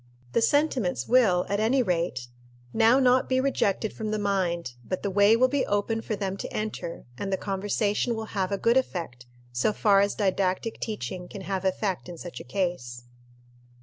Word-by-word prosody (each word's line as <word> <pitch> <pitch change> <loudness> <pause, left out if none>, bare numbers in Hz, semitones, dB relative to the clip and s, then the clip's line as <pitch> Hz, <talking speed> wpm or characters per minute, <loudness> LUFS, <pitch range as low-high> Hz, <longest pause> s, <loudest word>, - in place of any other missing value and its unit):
The - - +3
sentiments 245 - +1
will, 215 -8 +4
at 200 +1 -1
any 245 +4 +3
rate, 170 - -1 0.5
now 230 +3 +5
not 255 -1 +3
be 260 0 +2
rejected 220 -6 0
from 220 -1 -4
the 215 - -1
mind, 180 -8 -1
but 185 - -4
the 200 - -1
way 205 +3 +5
will 255 +2 +5
be 280 +1 0
open 205 +2 0
for 220 - -3
them 195 -1 -3
to - - -6
enter, 210 -5 -4
and 195 - -3
the 190 - +1
conversation 205 +4 -1
will 220 0 -4
have 190 -2 -1
a 200 - 0
good 230 +5 +3
effect, 165 - -3 0.2
so 120 - +1
far 200 -1 +4
as 200 0 +1
didactic 195 +1 0
teaching 180 - -5
can 200 - -8
have 190 -1 -3
effect 190 -1 -1
in 175 - -8
such 175 +1 -8
a - - -8
case. 125 -7 -3
200 Hz, 185 wpm, -26 LUFS, 180-225 Hz, 0.5 s, now